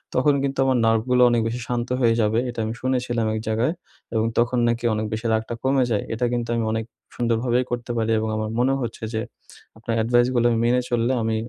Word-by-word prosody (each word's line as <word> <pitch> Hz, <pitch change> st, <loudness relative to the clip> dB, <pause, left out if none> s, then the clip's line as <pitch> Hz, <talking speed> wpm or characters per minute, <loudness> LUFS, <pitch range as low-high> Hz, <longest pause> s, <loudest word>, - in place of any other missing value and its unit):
তখন 145 Hz, +3 st, +4 dB
কিন্তু 135 Hz, 0 st, -2 dB
আমার 130 Hz, -1 st, +2 dB
নার্ভগুলা 115 Hz, +3 st, +3 dB
অনেক 120 Hz, -1 st, +2 dB
বেশি 120 Hz, +2 st, -3 dB
শান্ত 120 Hz, 0 st, -2 dB
হয়ে 115 Hz, -2 st, +4 dB
যাবে 110 Hz, +1 st, +2 dB
এটা 120 Hz, -, -6 dB
আমি 110 Hz, -, -3 dB
শুনেছিলাম 125 Hz, -3 st, 0 dB
এক -, -, -2 dB
জায়গায় 115 Hz, +7 st, +1 dB, 0.4 s
এবং 110 Hz, 0 st, +2 dB
তখন 120 Hz, +2 st, +2 dB
নাকি 120 Hz, 0 st, -1 dB
অনেক 110 Hz, 0 st, -1 dB
বেশি 110 Hz, +2 st, -4 dB
রাগটা 110 Hz, +1 st, -1 dB
কমে 135 Hz, 0 st, +3 dB
যায়। 105 Hz, -, +1 dB
এটা 120 Hz, +2 st, -1 dB
কিন্তু 120 Hz, -1 st, -2 dB
আমি 115 Hz, -, 0 dB
অনেক 110 Hz, 0 st, -2 dB, 0.3 s
সুন্দরভাবেই 120 Hz, +1 st, +1 dB
করতে 120 Hz, 0 st, -3 dB
পারি 115 Hz, 0 st, 0 dB
এবং 110 Hz, 0 st, -2 dB
আমার 110 Hz, 0 st, -2 dB
মনে 130 Hz, +2 st, +3 dB
হচ্ছে 120 Hz, -2 st, -5 dB
যে 110 Hz, -, -1 dB, 0.6 s
আপনার 115 Hz, +1 st, -4 dB
অ্যাডভাইসগুলা 120 Hz, +2 st, +2 dB
আমি 115 Hz, -, +1 dB
মেনে 125 Hz, +1 st, +3 dB
চললে 120 Hz, +1 st, +1 dB
আমি 110 Hz, 0 st, 0 dB
120 Hz, 210 wpm, -23 LUFS, 110-125 Hz, 0.6 s, তখন